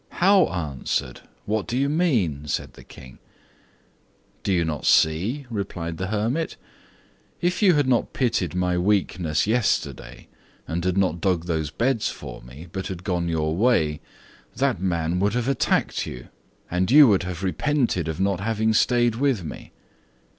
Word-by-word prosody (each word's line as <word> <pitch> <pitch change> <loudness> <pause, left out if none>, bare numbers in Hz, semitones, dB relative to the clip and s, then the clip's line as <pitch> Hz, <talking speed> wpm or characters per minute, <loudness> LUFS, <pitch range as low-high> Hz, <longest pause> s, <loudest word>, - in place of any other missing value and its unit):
"How 190 0 +4
answered? 75 -7 -3 0.2
What 105 -1 -1
do 120 - -2
you 140 +1 +2
mean?" 130 - +1
asked 75 - -3
the - - -14
King. 65 -1 -14 1.2
"Do - - -2
you 85 -3 +2
not 75 -2 -3
see," 100 - +2
replied 85 -6 -4
the 95 - -3
hermit. 115 +10 -1 0.8
"If 180 +3 0
you 190 -5 +5
had 145 -3 +2
not 125 -2 +1
pitied 100 - -1
my 90 -1 0
weakness 90 -4 +1
yesterday, 100 - -1 0.4
and 85 +1 -3
had 90 +1 0
not 90 -4 +1
dug 90 -4 0
those 80 -3 -1
beds 115 - 0
for - - -9
me, 65 +8 -12
but 95 -1 -4
had 90 -2 -7
gone 90 -3 -1
your 80 -1 0
way, 85 -9 +2 0.5
that - - 0
man 85 -2 0
would 100 +2 +1
have 125 0 -1
attacked 135 -2 0
you, 60 - -9 0.4
and 90 +2 0
you 145 +2 +8
would 100 -4 +3
have 90 0 -5
repented 115 - 0
of 80 +1 -4
not 95 -1 +1
having 110 +1 0
stayed 120 +1 +3
with 125 -4 0
me. 80 - -9
95 Hz, 160 wpm, -24 LUFS, 85-120 Hz, 1.2 s, you